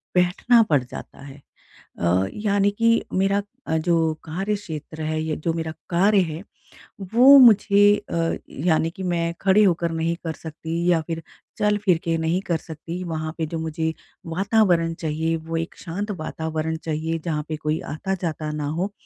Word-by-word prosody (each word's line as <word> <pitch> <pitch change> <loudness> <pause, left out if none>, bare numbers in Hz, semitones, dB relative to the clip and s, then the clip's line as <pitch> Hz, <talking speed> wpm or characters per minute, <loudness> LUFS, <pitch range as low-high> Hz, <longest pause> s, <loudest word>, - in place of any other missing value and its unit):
बैठना 180 +7 +4
पड़ 140 -4 +3
जाता 125 - -10
है। 140 0 -12 0.6
अ, 90 +3 +2
यानी 205 -1 +1
कि 230 0 +4 0.2
मेरा 195 +2 +2 0.2
अ, 160 - 0
जो 165 -1 +2
कार्यक्षेत्र 165 -3 -4
है, 155 0 -1
ये 160 -1 -2
जो 165 +1 -1
मेरा 160 -1 -3 0.2
कार्य 200 +4 +4
है, 165 -1 -3 0.7
वो 265 +4 +9
मुझे 205 -4 +6
अ, 165 0 0 0.3
यानी 160 -1 +3
कि 190 +3 -8
मैं 170 -1 -1
खड़े 195 +2 +5
होकर 170 -3 +2
नहीं 165 +1 -1
कर 165 -2 -3
सकती 160 +2 -5
या 165 -2 +3
फिर 165 -1 -3 0.4
चल-फिर 210 -4 +2
के 165 -1 0
नहीं 160 +3 0
कर 175 -4 -1
सकती 165 +3 -7
वहाँ 155 -1 -3
पे 165 - -1
जो 165 - -4
मुझे 160 0 -2 0.3
वातावरण 180 -2 +2
चाहिए 160 +1 -1
वो 165 +1 -5
एक 165 +1 -4
शांत 200 +5 -4
वातावरण 160 0 -3
चाहिए, 160 +1 -2
जहाँ 150 -3 -1
पे 155 - -2
कोई 155 +1 -1
आता-जाता 165 -2 -3
ना 150 -1 -3
हो। 175 +7 -2
165 Hz, 165 wpm, -23 LUFS, 160-190 Hz, 0.7 s, वो